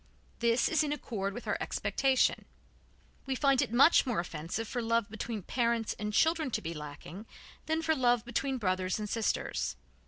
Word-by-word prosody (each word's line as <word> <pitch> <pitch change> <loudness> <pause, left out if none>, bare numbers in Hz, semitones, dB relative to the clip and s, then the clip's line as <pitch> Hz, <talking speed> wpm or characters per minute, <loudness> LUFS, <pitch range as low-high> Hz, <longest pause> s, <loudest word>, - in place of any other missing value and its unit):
This 235 +1 +3
is 315 -1 +2
in 295 - -2
accord 210 -9 -3
with 240 - -7
our - - 0
expectation; 265 -2 +1 0.8
we 265 - 0
find 275 0 +3
it 255 - -1
much 275 +8 +6
more 240 -7 0
offensive 170 +6 -4
for 245 - -3
love 230 -2 0
between 220 -1 -4
parents 235 -1 0
and 210 0 -2
children 320 +5 +2
to - - -6
be 165 0 -3
lacking 150 +7 -9 0.4
than 320 +1 0
for 320 - +2
love 245 -4 +2
between 265 +3 -1
brothers 185 -4 0
and 210 -1 -4
sisters. 225 +1 -1
235 Hz, 175 wpm, -31 LUFS, 205-270 Hz, 0.8 s, much